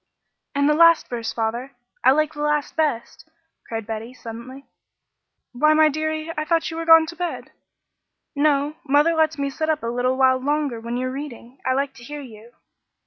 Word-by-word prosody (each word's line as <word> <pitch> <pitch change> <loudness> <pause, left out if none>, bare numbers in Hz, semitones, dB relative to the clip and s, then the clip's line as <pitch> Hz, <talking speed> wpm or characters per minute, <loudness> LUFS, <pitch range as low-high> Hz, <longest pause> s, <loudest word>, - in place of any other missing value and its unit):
"And 280 0 +2
the 300 - +4
last 335 +1 +5
verse, 235 -2 -3
father. 235 +4 -3 0.3
I 255 - +6
like 305 +3 +2
the 295 - -7
last 300 -1 0
best," 315 +1 -2 0.4
cried 225 -1 -4
Betty, 225 +3 -6
suddenly. 245 +4 -10 0.9
"Why, 305 +5 +3
my 310 0 +5
deary. 315 +1 -3
I 305 - -1
thought 330 +1 0
you 325 - -6
were 330 - -3
gone 325 -1 +8
to 335 +2 -8
bed." 350 0 -5 0.8
"No, 290 +1 +1
mother 295 +3 +3
lets 315 -1 +1
me 280 0 -2
sit 315 +3 -3
up 310 -4 0
a 230 +1 -2
little 250 +1 0
while 260 -1 +4
longer 285 -3 -1
when 235 +2 -4
you're 255 +1 -2
reading. 265 -2 -8
I 260 - +3
like 275 0 -1
to 240 - -15
hear 295 +3 -7
you." 230 -2 -13
280 Hz, 190 wpm, -22 LUFS, 245-310 Hz, 0.9 s, gone